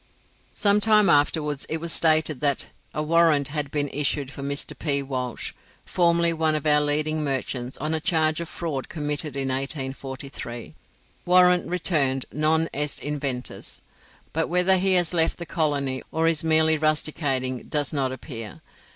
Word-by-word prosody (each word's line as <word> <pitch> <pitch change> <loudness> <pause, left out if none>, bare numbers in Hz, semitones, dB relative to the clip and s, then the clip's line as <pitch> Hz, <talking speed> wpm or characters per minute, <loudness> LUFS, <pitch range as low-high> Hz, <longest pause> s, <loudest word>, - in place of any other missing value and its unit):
Some 205 0 +3
time 210 -4 +5
afterwards 145 0 +1
it 160 - -1
was 165 0 -3
stated 155 -3 +2
that 140 -1 0 0.2
"a 150 - -3
warrant 160 -3 +3
had 145 -1 -3
been 145 0 -1
issued 140 -1 -1
for 140 - -9
Mr 140 +1 -2
P. 140 -3 -1
Walsh, 130 -3 -4 0.3
formerly 170 -1 +2
one 160 -1 +1
of 150 - -3
our 150 -1 +4
leading 155 +1 0
merchants, 130 -2 -3
on 155 +2 -2
a 160 - +1
charge 160 -2 +1
of 170 0 -5
fraud 150 -6 -4
committed 150 -1 -3
in 135 -1 -2
1843. 135 - -5 0.5
Warrant 180 0 +4
returned 150 -7 +1
'non 155 +2 +2
est 145 0 -1
inventus'; 140 -4 -4 0.5
but 160 +1 0
whether 180 +2 +4
he 190 +1 +2
has 180 -1 +2
left 165 -1 +2
the 170 - -6
colony, 145 -6 -1
or 160 +1 +1
is 165 -1 +1
merely 160 -1 +3
rusticating, 145 -4 -1
does 145 -1 -1
not 135 -3 0
appear. 115 - -8
150 Hz, 155 wpm, -24 LUFS, 140-165 Hz, 0.5 s, time